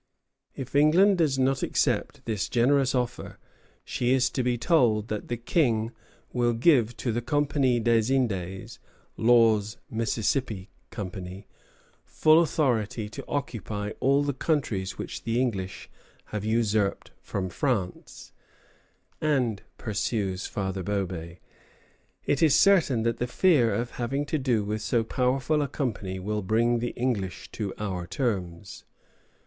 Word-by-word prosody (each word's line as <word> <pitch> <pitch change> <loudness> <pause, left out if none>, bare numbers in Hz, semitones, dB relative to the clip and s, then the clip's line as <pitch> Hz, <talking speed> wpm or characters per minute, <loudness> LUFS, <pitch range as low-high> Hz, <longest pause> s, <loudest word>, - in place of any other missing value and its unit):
If 135 +1 -7
England 175 +7 +5
does 150 -5 +2
not 135 0 +1
accept - - -1
this 110 -4 -2
generous 135 +2 +3
offer, 125 -1 -3 0.5
she 125 +1 0
is 130 -1 +2
to 130 - -1
be 125 -1 0
told 115 -6 +2
that 105 -1 -4
the 120 - -2
King 115 -3 +1 0.4
will 120 -1 +2
give 120 -2 +3
to 120 - -2
the 120 +2 -1
Compagnie 140 -2 +1
des 115 +1 +2
Indes 95 -8 -2 0.4
(Law's 115 -2 +3
Mississippi 110 -2 -1 0.2
Company) 95 -1 -7 0.6
full 155 +1 +4
authority 115 -9 0
to - - -8
occupy 105 -6 -3
"all 140 +2 +3
the 145 0 -1
countries 120 - -1
which - - -6
the 115 +1 -1
English 100 -7 -2 0.5
have 105 -2 -2
usurped 110 -2 0
from 95 -2 -3
France;" 100 -3 -3 0.9
and, 130 -9 +1 0.2
pursues 100 -3 -2
Father 95 -1 -3
Bobé, 90 -4 -3 0.9
"it 140 - +1
is 155 -4 +5
certain 165 - +4
that 115 0 0
the 125 - -1
fear 130 -4 +3
of 120 +4 -2
having 135 +4 -2
to 155 +1 -1
do 125 -5 +1
with 105 +1 -3
so 115 +1 +1
powerful 130 +5 0
a 145 - 0
company 110 -9 -3
will 105 +3 -2
bring 115 +4 +2
the 120 +1 -2
English 115 -7 -2
to 105 -3 -4
our 95 -4 -4
terms." 95 -4 -3
115 Hz, 135 wpm, -27 LUFS, 105-130 Hz, 0.9 s, England